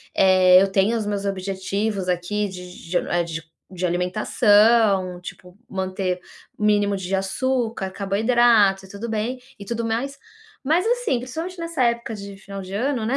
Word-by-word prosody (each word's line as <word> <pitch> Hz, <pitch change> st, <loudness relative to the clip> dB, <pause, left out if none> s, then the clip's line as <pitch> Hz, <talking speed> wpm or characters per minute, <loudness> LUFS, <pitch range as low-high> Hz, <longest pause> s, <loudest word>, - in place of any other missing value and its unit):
Eh, 185 Hz, -1 st, +6 dB
eu 195 Hz, 0 st, +1 dB
tenho 195 Hz, +4 st, +2 dB
os 215 Hz, -, -3 dB
meus 200 Hz, -1 st, -2 dB
objetivos 195 Hz, +1 st, -2 dB
aqui 185 Hz, +4 st, -1 dB
de 180 Hz, -2 st, -10 dB
de 180 Hz, -, +1 dB
eh, 175 Hz, 0 st, 0 dB
de 165 Hz, -1 st, -5 dB, 0.3 s
de 185 Hz, -1 st, -3 dB
alimentação, 200 Hz, +1 st, +3 dB
tipo 180 Hz, +1 st, -11 dB
manter 185 Hz, -1 st, -3 dB, 0.4 s
um 210 Hz, -, -5 dB
mínimo 205 Hz, -1 st, +3 dB
de 190 Hz, 0 st, -5 dB
açúcar, 225 Hz, +1 st, -1 dB
carboidrato 205 Hz, 0 st, +3 dB
e -, -, -16 dB
tudo 205 Hz, +4 st, -6 dB
bem, 225 Hz, +4 st, -2 dB, 0.2 s
e 200 Hz, -, -9 dB
tudo 235 Hz, +2 st, -3 dB
mais. 255 Hz, +5 st, -2 dB, 0.5 s
Mas 330 Hz, +8 st, +2 dB
assim, 480 Hz, -, +1 dB
principalmente 325 Hz, +9 st, -6 dB
nessa 335 Hz, -6 st, -1 dB
época 235 Hz, -1 st, 0 dB
de 200 Hz, -1 st, -9 dB
final 195 Hz, 0 st, -8 dB
de 190 Hz, 0 st, -9 dB
ano, 245 Hz, +2 st, -1 dB
né, 250 Hz, +5 st, 0 dB
200 Hz, 165 wpm, -22 LUFS, 190-235 Hz, 0.5 s, Eh